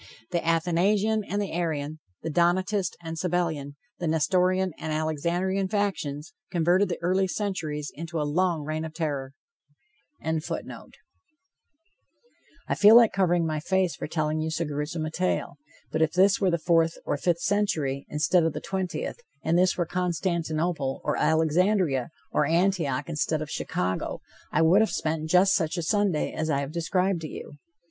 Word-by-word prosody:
The 170 - 0
Athanasian 185 +6 +2
and 205 - -2
the 205 - -2
Arian, 155 -3 -2 0.2
the 160 - -3
Donatist 180 +3 +1
and 165 0 -5
Sabellian, 160 -5 -1 0.2
the 175 - -2
Nestorian 185 +4 +2
and 160 - -4
Alexandrian 170 +5 0
factions 185 -7 -2 0.2
converted 180 +3 +2
the 170 - -2
early 190 +2 +2
centuries 170 -8 -3
into 165 +1 -5
a 150 - 0
long 170 +1 +1
reign 155 +1 -3
of 160 -1 -7
terror.] 140 -5 -3 0.9
I 160 0 -1 2.4
feel 210 +2 +7
like 235 -2 +7
covering 175 -3 +2
my 155 -1 -1
face 185 +2 0
for - - -5
telling 155 0 -1
you 160 - -1
so 165 +1 -1
grewsome 150 +2 -3
a 155 - -4
tale. 180 +3 -1 0.3
But 160 - -1
if 160 0 +2
this 190 +3 +4
were 190 - +3
the 170 - +1
fourth 165 0 +2
or - - 0
the 145 - -9
fifth 170 -1 +1
century, 160 -10 0
instead 155 +4 +2
of 165 -2 0
the - - -4
twentieth, 190 - -4 0.2
and 160 - +1
this 180 +1 +3
were 175 - +1
Constantinople, 170 -4 -1
or - - 0
Alexandria, 160 - +2 0.2
or 150 - +2
Antioch, 165 -5 +1
instead 155 -1 -1
of 150 - -9
Chicago, 90 +1 -2 0.3
I - - +3
would 180 +6 +5
have 220 - +2
spent 155 0 -2
just 185 +3 +5
such 165 0 0
a 170 - -2
Sunday 200 -3 +1
as 160 0 -2
I 140 -2 +1
have 140 +1 -5
described 175 +2 0
to 155 - -4
you. 145 - -9
165 Hz, 165 wpm, -26 LUFS, 155-185 Hz, 2.4 s, feel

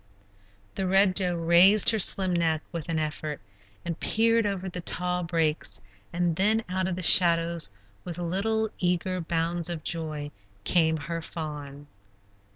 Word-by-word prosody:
The 190 -1 -3
Red 195 0 +3
Doe 180 -2 +1
raised 170 +6 +5
her 220 - -1
slim 190 -1 +4
neck 160 -2 0
with 165 -2 -7
an 165 - -1
effort, 155 -1 -4 0.5
and 170 -2 -5
peered 230 0 +2
over 195 -2 -4
the 180 -1 -5
tall 180 +1 -2
brakes, 165 -3 -2 0.3
and 175 -1 -1
then 215 +3 +2
out 185 0 -2
of 185 - -3
the 185 - -4
shadows, 170 - +4 0.3
with 175 -2 -7
little, 210 +5 -2
eager 180 0 -1
bounds 165 +1 -2
of 165 -3 -5
joy, 155 -3 -4 0.3
came 160 - +2
her 165 +3 -5
fawn. 145 -3 -8
175 Hz, 150 wpm, -26 LUFS, 160-185 Hz, 0.5 s, raised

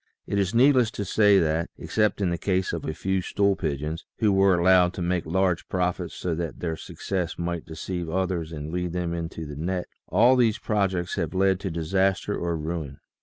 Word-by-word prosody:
It 100 - -1
is 100 +3 0
needless 125 -2 +5
to 100 - -2
say 105 0 +4
that, 80 -1 +1
except 105 -1 0
in 90 -3 +1
the 85 - -1
case 95 -2 0
of 85 - -4
a - - -1
few 95 +1 -1
stool 100 +2 +1
pigeons, 75 +2 -3
who 105 -3 +3
were 95 -2 +4
allowed 90 0 +4
to - - -4
make 90 -1 -1
large 90 0 0
profits 90 -1 -1
so 90 - -2
that 85 0 -4
their 80 -2 -2
success 90 +1 -4
might 85 -1 -3
deceive 85 +1 -5
others 90 -2 -1
and 75 0 -6
lead 90 -1 -2
them 90 -1 -2
into 80 -1 -5
the 75 -1 -7
net, 90 +4 -2 0.2
all 120 +8 +5
these 115 -3 +3
projects 95 -6 -1
have 85 0 -2
led 95 0 +3
to 95 - -3
disaster 95 +4 0
or 85 -1 -2
ruin. 80 -3 -4
90 Hz, 200 wpm, -25 LUFS, 85-95 Hz, 0.2 s, needless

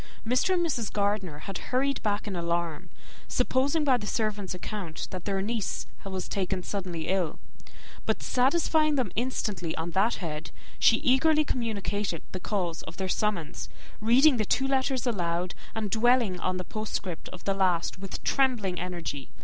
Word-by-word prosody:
Mr. 255 +11 +3
and 345 -1 +2
Mrs. 240 -10 -1
Gardiner 200 -6 0
had 195 -2 -4
hurried 275 +2 +1
back 205 0 0
in 200 - -2
alarm, 170 0 -1 0.4
supposing, 270 +5 +2
by 265 -4 +5
the 210 -3 -6
servant's 210 -5 -1
account, 180 -3 -5
that 185 -2 -6
their 195 -1 0
niece 220 -1 -1 0.2
was 190 -2 -4
taken 190 -1 -1
suddenly 180 -5 -3
ill; 185 -4 0 0.7
but - - 0
satisfying 305 +3 +3
them 250 -9 0
instantly 210 -8 -1
on 165 +1 -2
that 200 +6 +3
head, 160 -3 -4 0.3
she 225 - +6
eagerly 305 +4 +4
communicated 205 - -2
the 185 - -4
cause 180 -4 -2
of 160 - -10
their 190 - -1
summons, 185 -5 -1 0.3
reading 250 +6 +6
the 215 - +2
two 270 +6 +2
letters 265 -1 +1
aloud, 175 -5 0 0.2
and 215 -3 -2
dwelling 230 -4 +3
on 185 +1 0
the 185 - -2
postscript 195 -5 -4
of 180 - -10
the 195 - +1
last 185 -3 +1
with 195 -1 -6
trembling 230 -10 +2
energy. 170 -6 -4
205 Hz, 160 wpm, -28 LUFS, 180-245 Hz, 0.7 s, she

